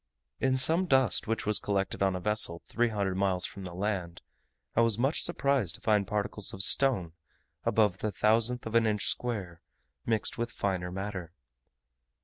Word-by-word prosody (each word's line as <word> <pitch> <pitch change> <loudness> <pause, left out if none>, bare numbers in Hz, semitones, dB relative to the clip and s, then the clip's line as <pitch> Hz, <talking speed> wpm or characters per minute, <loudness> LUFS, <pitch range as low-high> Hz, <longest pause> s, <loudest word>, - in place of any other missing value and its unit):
In 130 -1 +1
some 165 +8 +3
dust 130 -4 +2
which 115 +1 -2
was 105 0 +2
collected 100 -1 -2
on 95 -1 +2
a - - -3
vessel 100 -3 +1
three 120 0 0
hundred 100 -3 -2
miles 95 -2 +1
from 95 - -7
the 90 -1 -8
land, 95 -3 -3 0.5
I 115 - +4
was 115 -2 +2
much 135 +6 +1
surprised 140 - 0
to - - -10
find 105 -3 +1
particles 105 0 -2
of 95 - +5
stone 100 -11 +3 0.5
above 105 -4 +2
the 110 - -2
thousandth 115 +5 +1
of 110 - -6
an 115 -1 +3
inch 105 -2 0
square, 100 -9 -3 0.5
mixed 115 +1 0
with 120 0 -1
finer 95 -5 -2
matter. 95 -3 -6
105 Hz, 170 wpm, -29 LUFS, 95-115 Hz, 0.5 s, of